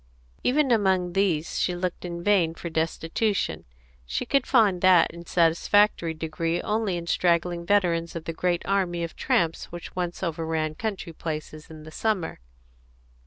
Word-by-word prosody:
Even 275 +1 +2
among 190 -5 +2
these 175 -5 0
she 180 - 0
looked 180 0 -3
in 170 -1 -5
vain 180 -5 +3
for 170 - -6
destitution; 165 +6 -1 0.4
she - - -3
could 275 - +1
find 210 -8 +3
that 185 -3 +5
in 170 0 -11
satisfactory 170 +1 +3
degree 165 +2 -2
only 210 -4 0
in 170 - -5
straggling 170 0 +1
veterans 175 -5 +1
of 165 - -5
the 165 - -3
great 175 +1 0
army 180 -3 0
of 165 - -5
tramps 165 -1 0
which 175 0 -9
once 180 0 -3
overran 160 -2 -2
country 195 -2 -4
places 155 -1 -6
in 155 -1 -11
the 155 - -11
summer. 195 - -1
175 Hz, 155 wpm, -26 LUFS, 165-195 Hz, 0.4 s, that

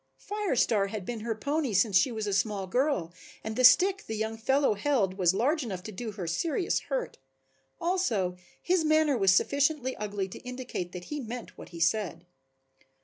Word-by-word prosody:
Fire 415 -6 -2
Star 210 -4 +2
had 200 -2 -6
been 235 +1 -4
her 225 +1 -3
pony 280 -1 -1
since 200 0 +3
she 185 +8 +4
was 220 -2 -3
a 205 - -1
small 200 0 0
girl 190 - 0 0.3
and 220 0 -4
the 255 - +1
stick 385 +9 +6
the 220 - -3
young 220 +1 -2
fellow 265 +3 +2
held 210 -3 +1
was 180 -3 +3
large 290 +9 +1
enough 190 -6 -5
to 215 - -7
do 220 +2 -6
her 190 -3 -5
serious 320 - 0
hurt, - - -3 0.6
also 240 - 0 0.3
his 355 -2 +2
manner 310 -2 +3
was 195 -5 +4
sufficiently 280 +5 +2
ugly 205 -2 -3
to - - -9
indicate 250 -8 -6
that 180 -1 -7
he 295 - -3
meant 240 -1 -7
what - - -11
he 170 - -9
said. 170 -1 0
225 Hz, 190 wpm, -29 LUFS, 195-285 Hz, 0.6 s, stick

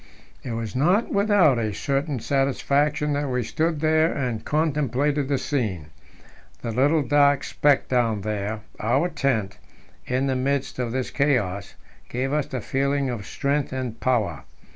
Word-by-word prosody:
It 120 - -5
was 115 +1 -4
not 180 - +2
without 200 - +4
a 110 -3 -2
certain 140 -1 -1
satisfaction 140 +3 +1
that 145 -1 -1
we 125 -1 0
stood 160 +5 -1
there 160 +1 +3
and 125 -5 -2
contemplated 145 -2 0
the 140 -1 +1
scene. 105 - -2 0.7
The 115 - -2
little 145 +6 +3
dark 145 0 +3
speck 145 -2 +2
down 115 -5 +1
there 105 +1 -3 0.2
our 120 +11 +1
tent 115 - -1 0.5
in 130 +2 0
the 135 -1 0
midst 135 +1 -1
of 120 -2 -1
this 130 +1 -2
chaos, 105 -9 0 0.3
gave 130 +3 -2
us 150 -2 -1
a 130 - -3
feeling 140 +2 0
of 105 -5 -6
strength 140 0 -1
and 125 -3 -4
power. 110 - 0
135 Hz, 150 wpm, -24 LUFS, 115-145 Hz, 0.7 s, without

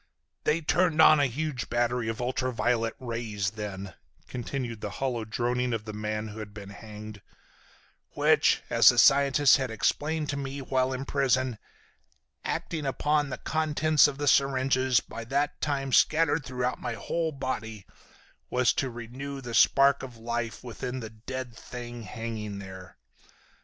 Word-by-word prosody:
"They 160 +2 +2
turned 165 +1 +2
on 155 - +8
a 140 - +4
huge 135 0 -3
battery 120 0 0
of 115 - -4
ultra 130 +1 -1
violet 115 0 0
rays 115 -5 -3
then," 100 -3 -6 0.3
continued 120 -2 -4
the 105 - -3
hollow 125 -4 -2
droning 125 +2 -1
of 110 -1 -3
the 110 - -6
man 105 +1 -3
who 105 +1 -9
had 105 -1 -8
been 100 -2 -9
hanged, 105 0 -10 0.9
"which, - - +3
as - - +7
the - - +2
scientist 140 0 +6
had 130 -2 -2
explained 150 +7 0
to 140 - -3
me 140 0 -4
while 130 -1 0
in 130 +1 -4
prison, 130 -4 +1 0.8
acting 155 -4 -3
upon 145 +2 +1
the 130 - -4
contents 155 -2 +3
of 140 -2 -5
the 145 0 -2
syringes, 130 -2 +3
by 115 - -8
that 140 +4 -1
time 135 -3 -1
scattered 160 -1 +4
through 125 0 -1
my - - -3
whole 165 -1 -2
body, 115 -7 -5 0.6
was 125 -1 +3
to 135 -3 -1
renew 125 +4 -7
the 120 -3 -7
spark 140 +5 +5
of 125 -3 -9
life 115 -1 -4
within 125 +1 -5
the 110 -3 -7
dead 120 +2 -7
thing 120 0 -8
hanging 110 -1 -5
there. 95 -2 -10
125 Hz, 155 wpm, -28 LUFS, 115-140 Hz, 0.9 s, on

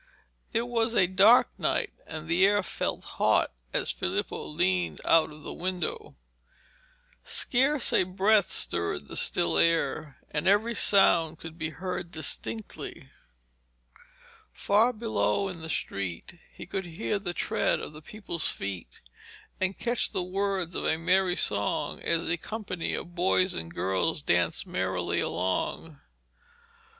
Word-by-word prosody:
It 230 +1 0
was 235 -1 0
a 190 - +5
dark 195 +7 +5
night, - - -1
and 160 0 -7
the 175 +3 +3
air 205 0 +4
felt - - -3
hot - - +1 0.2
as - - 0
Filippo - - -3
leaned 175 +3 0
out 165 -1 +4
of 150 0 -13
the - - -6
window. 185 - -4 1.1
Scarce 270 +2 +2
a - - +5
breath 195 +3 +2
stirred 85 -4 +2
the - - -7
still 85 - +3
air, 160 -3 +1
and 150 +4 -2
every 210 +4 +3
sound 170 -7 +3
could 160 0 -10
be 160 -1 -3
heard 180 +1 -5
distinctly. 115 -9 -4 1.4
Far 215 +5 +2
below 200 - 0
in 175 -3 -8
the 160 - -7
street 100 - -4
he - - -10
could 190 -1 -4
hear 165 - -3
the 185 -3 -4
tread - - 0
of - - -7
the 155 - -11
people's 170 -2 -3
feet, 95 -3 -6 0.6
and 190 +1 -1
catch 240 0 0
the 185 - -1
words 190 -1 -2
of - - -3
a 160 - +1
merry 180 +2 +2
song 100 - +1
as 165 0 0
a 170 - 0
company 195 -3 -4
of 175 - -7
boys 185 +1 +2
and 80 0 -5
girls 95 - -1
danced 85 - +1
merrily 90 -1 -1
along. 140 - -2
175 Hz, 140 wpm, -28 LUFS, 150-195 Hz, 1.4 s, a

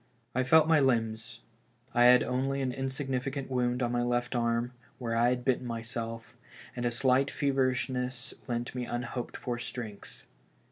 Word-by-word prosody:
I 130 - +2
felt 155 +5 +5
my 160 -2 +5
limbs; 115 -3 0 0.5
I 120 0 +5
had 125 0 +8
only 135 +2 -1
an 130 - 0
insignificant 135 0 -3
wound 125 0 +1
on 120 - 0
my 120 0 +1
left 120 +1 0
arm, 115 0 +1 0.3
where 115 -2 -2
I 120 +1 +4
had 125 0 -1
bitten 130 -1 +1
myself, 115 0 -5 0.4
and 120 0 -1
a - - +3
slight 130 +3 +2
feverishness 130 -2 0
lent 120 -1 -2
me 125 -1 -3
unhoped 120 0 -4
for 120 -1 -3
strength. 115 -4 -7
125 Hz, 155 wpm, -30 LUFS, 120-130 Hz, 0.5 s, had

